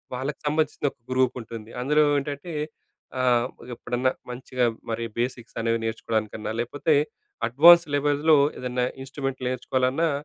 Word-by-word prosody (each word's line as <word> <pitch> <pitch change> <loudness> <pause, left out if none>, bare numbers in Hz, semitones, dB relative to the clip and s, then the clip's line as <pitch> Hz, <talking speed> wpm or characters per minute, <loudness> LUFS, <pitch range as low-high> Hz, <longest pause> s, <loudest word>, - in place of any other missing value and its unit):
వాళ్లకి 135 +3 -4
సంబంధించిన 155 -1 0
ఒక - - -48
గ్రూప్ 130 0 +2
ఉంటుంది. 115 -1 -9
అందులో 150 +4 +3 0.2
ఏంటంటే, 145 +4 -6 0.7
ఆహ్, 125 -1 +3 0.3
ఎప్పుడన్నా 125 +2 0 0.2
మంచిగా 125 0 -1 0.3
మరి 115 +1 -2 0.2
బేసిక్స్‌ని 120 -2 -3
అనేవి 115 0 +1
నేర్చుకోవడానికన్నా, 110 -1 -2
లేకపోతే 145 +6 0 0.5
అడ్వాన్స్డ్ 165 +5 +7
లెవెల్స్‌లో 145 +2 +3 0.2
ఏదన్నా 125 0 -1 0.2
ఇన్స్ట్రుమెంట్‌ని 135 -1 -4
నేర్చుకోవాలన్నా, 130 +5 0
130 Hz, 115 wpm, -25 LUFS, 120-145 Hz, 0.7 s, అడ్వాన్స్డ్